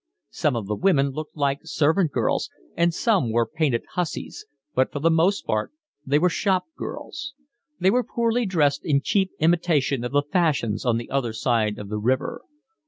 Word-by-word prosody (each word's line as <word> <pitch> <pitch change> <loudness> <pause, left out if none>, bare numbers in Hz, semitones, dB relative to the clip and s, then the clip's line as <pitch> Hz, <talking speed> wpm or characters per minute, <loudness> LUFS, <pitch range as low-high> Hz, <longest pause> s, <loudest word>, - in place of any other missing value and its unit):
Some - - 0
of 115 -3 -3
the 105 - -2
women 140 - +2
looked 155 +3 -7
like 140 -1 +1
servant 160 +2 +1
girls, - - 0 0.3
and 170 0 +3
some 180 - +1
were 115 +1 +2
painted 135 -1 0
hussies, 180 -3 -4 0.3
but 130 +1 +1
for - - -5
the 165 +4 +2
most 170 +5 +2
part 110 - -1 0.3
they 140 +1 +2
were 175 +4 +3
shop 185 +1 +1
girls. 300 -3 -7 0.4
They 185 +2 +4
were 250 +3 +2
poorly 235 -1 0
dressed 150 -6 +1
in 140 -3 +2
cheap 195 -2 +1
imitation 155 -6 +2
of 125 - -3
the 145 0 +3
fashions 145 - 0
on 115 -1 +3
the 120 - -6
other 130 -4 0
side 110 -3 0
of 100 -1 -8
the 105 0 -2
river. 130 +5 -1
145 Hz, 180 wpm, -24 LUFS, 125-180 Hz, 0.4 s, They